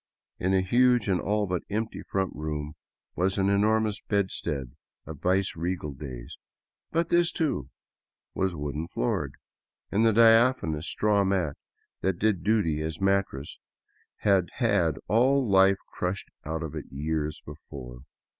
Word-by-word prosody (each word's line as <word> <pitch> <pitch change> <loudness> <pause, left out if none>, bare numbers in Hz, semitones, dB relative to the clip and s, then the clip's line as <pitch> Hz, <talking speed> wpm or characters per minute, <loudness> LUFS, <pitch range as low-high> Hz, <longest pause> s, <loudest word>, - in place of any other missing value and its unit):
In 95 - 0
a 95 - +4
huge 120 +2 +3
and 95 -3 +1
all 105 +1 +1
but 90 -2 -2
empty 110 +2 -3
front 95 -1 -2
room 75 0 -4 0.4
was 95 +3 +1
an 95 0 +2
enormous 105 +1 +2
bedstead 80 - -2 0.3
of 80 -3 -9
viceregal 90 -3 0
days; 65 -4 -8 0.5
but 165 +1 0
this, 175 0 +3
too, 105 - -1 0.6
was 95 -2 -1
wooden 75 +2 -4
floored, - - -2 0.6
and 105 +3 +2
the 115 - +5
diaphanous 115 - +4
straw 105 -1 +2
mat 95 -6 0 0.5
that 95 -2 0
did 100 -4 +1
duty 95 -7 +1
as 80 0 -4
mattress 95 -8 0 0.6
had 95 -4 +3
had 100 - +2
all 130 +4 +3
life 95 -1 +5 0.2
crushed 90 +2 -3 0.2
out 80 +2 -3
of 80 -2 -5
it 75 -3 -5
years 75 +2 -2
before. - - -10
95 Hz, 135 wpm, -27 LUFS, 80-105 Hz, 0.6 s, the